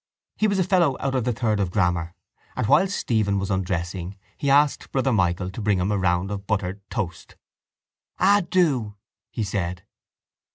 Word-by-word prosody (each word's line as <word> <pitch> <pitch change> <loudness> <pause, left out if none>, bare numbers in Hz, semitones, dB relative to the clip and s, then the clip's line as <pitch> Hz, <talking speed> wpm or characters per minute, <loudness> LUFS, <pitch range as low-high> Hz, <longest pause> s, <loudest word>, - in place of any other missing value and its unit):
He 215 - +2
was 200 -2 0
a 185 - +3
fellow 170 -7 +2
out 135 -1 -1
of 130 -3 0
the 125 - +1
third 110 -3 0
of 95 -3 0
grammar 90 -3 0 0.4
and, - - -1
while 190 - +4
Stephen 110 - 0
was 100 +1 -2
undressing, 90 0 -3 0.2
he 140 - -2
asked 145 +1 +3
Brother 135 -1 +1
Michael 90 -2 0
to 105 - -7
bring 105 -2 +2
him 95 +3 0
a 105 - +1
round 90 +1 +1
of 100 -1 -5
buttered 100 -2 -2
toast. 90 -7 -5 0.8
—Ah, 200 +2 +5
do! 135 - +1 0.3
he 115 - -3
said. 90 -3 -3
105 Hz, 175 wpm, -24 LUFS, 90-135 Hz, 0.8 s, Ah